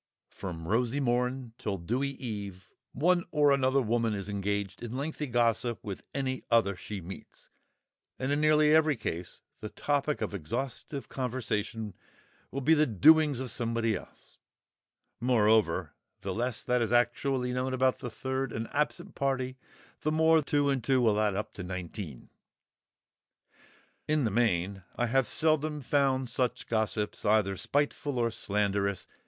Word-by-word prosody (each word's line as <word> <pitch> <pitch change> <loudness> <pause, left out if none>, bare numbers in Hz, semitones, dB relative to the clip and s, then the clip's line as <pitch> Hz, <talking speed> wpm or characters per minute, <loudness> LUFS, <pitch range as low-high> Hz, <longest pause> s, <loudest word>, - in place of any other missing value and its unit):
From 85 -4 -6
rosy 120 +6 +1
morn 125 -1 0
till 100 -2 -2
dewy 120 +11 -1
eve 100 -8 -7 0.2
one 175 +5 +2
or 145 -1 +4
another 135 0 +3
woman 115 -1 +1
is 100 0 -5
engaged 100 0 -2
in 120 +1 -5
lengthy 150 +1 -3
gossip 120 -1 +1
with 100 -2 -5
any 130 -2 -2
other 115 -4 +3
she 95 +2 -7
meets, 90 +3 -10 0.7
and 130 +2 -2
in 145 +1 +1
nearly 155 0 +5
every 155 -2 +5
case 85 -6 -5 0.2
the 105 - -6
topic 145 +3 -1
of - - -3
exhaustive 125 - -4
conversation 115 -4 -3 0.6
will 140 - -4
be 155 +5 +5
the 155 -1 +4
doings 150 - +5
of 130 -3 -3
somebody 115 -2 0
else; - - -12 0.8
moreover, 110 -7 +3 0.3
the 95 0 -3
less 120 +2 -1
that 125 -1 +1
is 115 -1 0
actually 125 +1 +1
known 130 +1 -1
about 130 0 +2
the 125 - -5
third 130 +2 -3
and 115 0 -4
absent 150 +1 -1
party 130 -2 -1 0.4
the 155 - -1
more 160 0 +4
two 145 -1 +1
and 135 -4 +1
two 135 -2 +3
will 110 -4 +3
add 105 -2 +1
up 105 - -3
to - - -7
nineteen. 90 - -6 1.8
In 155 -1 +2
the 110 - +1
main, 100 -4 +1
I 120 - +1
have 130 0 +2
seldom 155 +1 +1
found 135 -1 +1
such 125 +1 -1
gossips 110 -2 -1
either 105 -2 +3
spiteful 145 - -1
or 115 -1 +1
slanderous. 100 -2 -1
120 Hz, 150 wpm, -30 LUFS, 105-140 Hz, 1.8 s, nearly